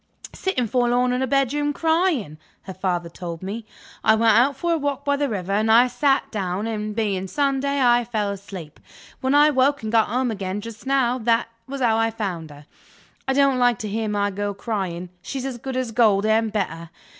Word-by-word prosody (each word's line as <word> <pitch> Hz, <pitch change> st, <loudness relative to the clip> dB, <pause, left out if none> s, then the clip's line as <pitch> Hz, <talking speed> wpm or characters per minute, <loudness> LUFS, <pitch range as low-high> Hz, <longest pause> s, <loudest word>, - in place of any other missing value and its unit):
"Sitting 320 Hz, -11 st, -1 dB
forlorn 245 Hz, +2 st, +1 dB
in 250 Hz, -, -1 dB
her 265 Hz, -, 0 dB
bedroom, 280 Hz, +2 st, +1 dB
crying," 320 Hz, -, 0 dB, 0.2 s
her 190 Hz, -, -8 dB
father 180 Hz, -2 st, -2 dB
told 170 Hz, 0 st, -7 dB
me. 215 Hz, +3 st, -5 dB, 0.4 s
"I 220 Hz, -, +5 dB
went 225 Hz, -1 st, +4 dB
out 260 Hz, +4 st, +3 dB
for 340 Hz, +5 st, -1 dB
a -, -, +1 dB
walk 285 Hz, -1 st, -2 dB
by 285 Hz, 0 st, +2 dB
the 285 Hz, -1 st, -1 dB
river, 195 Hz, -3 st, -3 dB
and 215 Hz, +2 st, +2 dB
I 235 Hz, +3 st, +7 dB
sat 270 Hz, +3 st, +1 dB
down, 195 Hz, -1 st, -2 dB
and 215 Hz, -2 st, -3 dB
(being 200 Hz, -4 st, -1 dB
Sunday) 280 Hz, +3 st, 0 dB
I 240 Hz, -2 st, +4 dB
fell 215 Hz, -3 st, -2 dB
asleep. 190 Hz, -6 st, -9 dB, 0.4 s
When 265 Hz, +1 st, +1 dB
I 295 Hz, +1 st, +6 dB
woke, 280 Hz, 0 st, +2 dB
and 215 Hz, -, -3 dB
got 225 Hz, -1 st, +4 dB
home 245 Hz, +2 st, 0 dB
again 195 Hz, -1 st, -3 dB
just 225 Hz, +3 st, -9 dB
now, 260 Hz, -2 st, +2 dB
that 230 Hz, 0 st, +1 dB, 0.2 s
was 275 Hz, 0 st, -5 dB
how 225 Hz, -3 st, +3 dB
I 225 Hz, 0 st, +2 dB
found 190 Hz, -8 st, -4 dB
her. 145 Hz, 0 st, -13 dB, 0.6 s
I 265 Hz, -, +2 dB
don't 275 Hz, -2 st, +3 dB
like 245 Hz, -2 st, +3 dB
to 215 Hz, -, -5 dB
hear 220 Hz, +1 st, -2 dB
my 205 Hz, -1 st, 0 dB
girl 205 Hz, +1 st, -3 dB
crying; 190 Hz, -5 st, -4 dB
she's 265 Hz, +6 st, -5 dB
as 255 Hz, -3 st, -5 dB
good 265 Hz, +1 st, -4 dB
as 255 Hz, -3 st, -2 dB
gold 215 Hz, -3 st, +3 dB
and 220 Hz, 0 st, +2 dB
better. 170 Hz, -5 st, -3 dB
225 Hz, 205 wpm, -23 LUFS, 200-265 Hz, 0.6 s, I